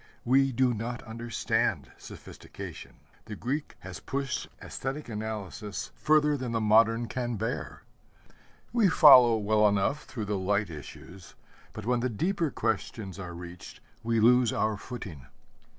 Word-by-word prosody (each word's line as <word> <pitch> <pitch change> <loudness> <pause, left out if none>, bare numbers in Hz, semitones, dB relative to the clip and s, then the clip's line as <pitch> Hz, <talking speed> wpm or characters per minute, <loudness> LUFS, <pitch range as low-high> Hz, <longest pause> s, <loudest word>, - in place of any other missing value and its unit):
We 135 +2 +4
do 130 0 +2
not 120 +2 -5
understand 115 +1 -2
sophistication. - - -10 0.3
The 110 - -7
Greek 140 +8 -4
has 95 -1 -8
pushed 135 -2 -3
aesthetic 135 +3 -5
analysis 105 -1 -5
further 150 -1 +3
than 125 -4 -4
the 115 - +1
modern 115 +2 +4
can 120 +1 -3
bear. 115 +4 -4 0.9
We 225 -5 +4
follow 130 -8 +8
well 105 0 +3
enough 105 +9 0
through 110 -6 -5
the 105 -1 -2
light 100 0 0
issues, 85 +4 -11 0.4
but 110 - -8
when 125 +1 +1
the 130 +2 -1
deeper 165 - -1
questions 110 -4 -3
are 90 -2 -7
reached 90 0 -10 0.2
we 115 0 0
lose 120 +1 +5
our 110 0 0
footing. 95 - -9
115 Hz, 135 wpm, -28 LUFS, 105-130 Hz, 0.9 s, follow